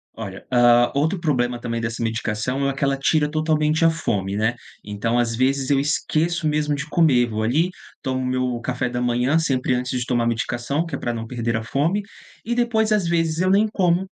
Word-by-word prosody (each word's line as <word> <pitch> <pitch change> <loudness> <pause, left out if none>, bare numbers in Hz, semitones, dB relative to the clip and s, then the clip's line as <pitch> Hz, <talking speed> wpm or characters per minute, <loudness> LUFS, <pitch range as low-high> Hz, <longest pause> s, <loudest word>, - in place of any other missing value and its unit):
Olha, 100 -4 -8
ah, 120 -1 +5
outro 160 +7 0
problema 125 -7 0
também 115 -1 -3
dessa 115 0 -3
medicação 115 +4 -2
é - - +1
o - - -7
que 140 - -4
ela 140 0 +1
tira 150 +2 +1
totalmente 155 0 +1
a - - +7
fome, 100 -12 -2
né, 110 +3 0 0.3
então, 105 +3 -2
às 120 -1 +1
vezes 135 +1 +1
eu 140 -1 +3
esqueço 155 +3 0
mesmo 150 -1 0
de 140 +1 -4
comer. 140 -8 +3
Vou 110 0 -3
ali, 155 +10 +2 0.3
tomo 130 -2 -2
meu 125 -1 -1
café 125 +1 -2
da 125 0 -3
manhã, 125 +5 +2
sempre 130 -5 0
antes 125 +1 -1
de 125 - -2
tomar 120 -2 0
a - - +1
medicação, 120 +6 -1
que 165 - -5
é - - -3
para 120 - -2
não 115 -1 -5
perder 115 -1 -2
a 110 - -2
fome, 155 - 0 0.4
e 235 - -1
depois 230 -3 +1
às 205 -5 +2
vezes 165 -1 0
eu 185 +1 +2
nem 205 +3 +4
como. 180 -2 +1
130 Hz, 215 wpm, -22 LUFS, 120-160 Hz, 0.4 s, a